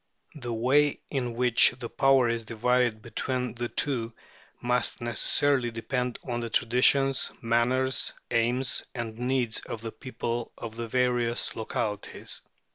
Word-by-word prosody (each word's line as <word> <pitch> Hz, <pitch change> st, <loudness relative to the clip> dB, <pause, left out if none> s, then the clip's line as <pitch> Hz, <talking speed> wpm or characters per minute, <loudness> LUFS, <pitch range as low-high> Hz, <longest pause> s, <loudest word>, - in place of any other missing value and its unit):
The 125 Hz, -5 st, -6 dB
way 135 Hz, +6 st, +2 dB
in 125 Hz, -4 st, -2 dB
which 125 Hz, 0 st, +5 dB
the 120 Hz, -2 st, -5 dB
power 135 Hz, 0 st, +3 dB
is 115 Hz, -1 st, -1 dB
divided 115 Hz, 0 st, 0 dB
between 125 Hz, 0 st, -3 dB
the 120 Hz, 0 st, -4 dB
two 120 Hz, -5 st, -1 dB, 0.5 s
must 125 Hz, 0 st, 0 dB
necessarily 120 Hz, +2 st, +3 dB
depend 125 Hz, +2 st, -3 dB
on 120 Hz, -1 st, -2 dB
the 115 Hz, -1 st, -4 dB
traditions, 130 Hz, +4 st, +3 dB
manners, 125 Hz, +3 st, +1 dB, 0.2 s
aims, 120 Hz, +3 st, +1 dB
and 115 Hz, -2 st, -4 dB
needs 125 Hz, -2 st, 0 dB
of 110 Hz, -, -7 dB
the 115 Hz, -1 st, -5 dB
people 120 Hz, -2 st, -5 dB
of 115 Hz, -1 st, -7 dB
the 115 Hz, 0 st, -5 dB
various 120 Hz, -1 st, 0 dB
localities. 105 Hz, -2 st, -4 dB
120 Hz, 130 wpm, -27 LUFS, 115-130 Hz, 0.5 s, which